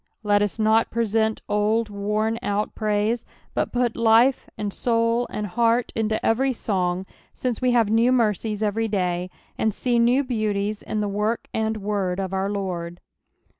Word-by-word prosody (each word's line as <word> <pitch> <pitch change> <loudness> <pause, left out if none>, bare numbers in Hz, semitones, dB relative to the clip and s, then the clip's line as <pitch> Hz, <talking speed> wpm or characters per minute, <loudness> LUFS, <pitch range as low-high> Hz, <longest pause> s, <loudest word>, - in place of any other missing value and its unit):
Let 205 -1 +3
us 205 +1 -1
not 220 +1 +3
present 220 -1 0
old 215 +2 +1
worn 210 +3 -1
out 205 +1 -1
prsise, 215 +2 0 0.3
but - - -1
put 245 -2 0
life, 230 +3 +4
and 205 -2 -3
soul, 230 0 +1
and 210 - -3
heart, 230 +3 +1
into 220 -1 -1
every 260 +4 +2
song, 185 -5 -1 0.3
since 250 -2 -2
we 250 -1 +2
have 230 -3 +3
new 230 +3 +4
mercies 220 -3 +1
every 220 +2 0
day, 180 -3 -1 0.3
and 220 - +2
see 240 +3 0
new 245 +4 +4
beauties 215 -4 -1
in 215 - -3
the 205 - -1
work 210 +3 -2
and 220 0 -1
word 195 -3 -2
of 190 -1 -3
our 190 +1 0
Lord. 180 -4 -4
215 Hz, 165 wpm, -24 LUFS, 205-230 Hz, 0.3 s, life